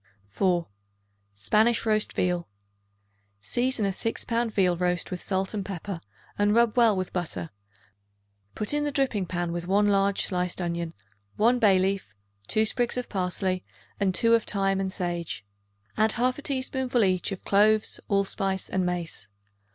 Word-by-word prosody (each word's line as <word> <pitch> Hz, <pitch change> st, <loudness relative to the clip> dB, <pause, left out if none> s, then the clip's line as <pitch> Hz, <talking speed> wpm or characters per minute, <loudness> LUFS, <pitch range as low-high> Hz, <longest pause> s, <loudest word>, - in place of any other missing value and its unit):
4. 175 Hz, -, +1 dB, 0.7 s
Spanish 215 Hz, -, +2 dB
Roast 215 Hz, -1 st, +1 dB
Veal. 180 Hz, -1 st, 0 dB, 0.9 s
Season 240 Hz, -, +1 dB
a 195 Hz, -, +1 dB
6 225 Hz, +4 st, -2 dB
pound 235 Hz, -1 st, 0 dB
veal 185 Hz, -4 st, +2 dB
roast 180 Hz, 0 st, -1 dB
with 180 Hz, -, -4 dB
salt 190 Hz, +1 st, -1 dB
and 205 Hz, -2 st, -2 dB
pepper 190 Hz, -1 st, -6 dB, 0.4 s
and 205 Hz, +1 st, +3 dB
rub 235 Hz, -1 st, +3 dB
well 230 Hz, -4 st, +5 dB
with 185 Hz, -1 st, -3 dB
butter; 155 Hz, -, -3 dB, 1.0 s
put 210 Hz, +6 st, -2 dB
in 295 Hz, 0 st, +1 dB
the 295 Hz, -, -1 dB
dripping 255 Hz, -9 st, 0 dB
pan 175 Hz, -1 st, -2 dB
with 175 Hz, 0 st, -4 dB
one 205 Hz, +2 st, +3 dB
large 200 Hz, -1 st, +3 dB
sliced 180 Hz, -1 st, -1 dB
onion, 170 Hz, -2 st, -3 dB, 0.4 s
1 240 Hz, +3 st, +3 dB
bay 205 Hz, -5 st, +5 dB
leaf, 190 Hz, -, -1 dB, 0.3 s
2 220 Hz, 0 st, +2 dB
sprigs 240 Hz, +2 st, 0 dB
of 250 Hz, -, -3 dB
parsley 185 Hz, -1 st, -1 dB, 0.4 s
and 190 Hz, -2 st, +1 dB
2 230 Hz, 0 st, +4 dB
of 230 Hz, -1 st, +4 dB
thyme 195 Hz, -1 st, +1 dB
and 190 Hz, -1 st, -2 dB
sage. 175 Hz, -, -3 dB, 0.5 s
Add 220 Hz, 0 st, +3 dB
1/2 255 Hz, +4 st, 0 dB
teaspoonful 260 Hz, -3 st, 0 dB
each 185 Hz, 0 st, +1 dB
of 195 Hz, -, -6 dB
cloves, 215 Hz, +2 st, +3 dB
allspice 195 Hz, -1 st, 0 dB
and 190 Hz, -, 0 dB
mace. 175 Hz, -, -4 dB
195 Hz, 155 wpm, -26 LUFS, 180-220 Hz, 1.0 s, well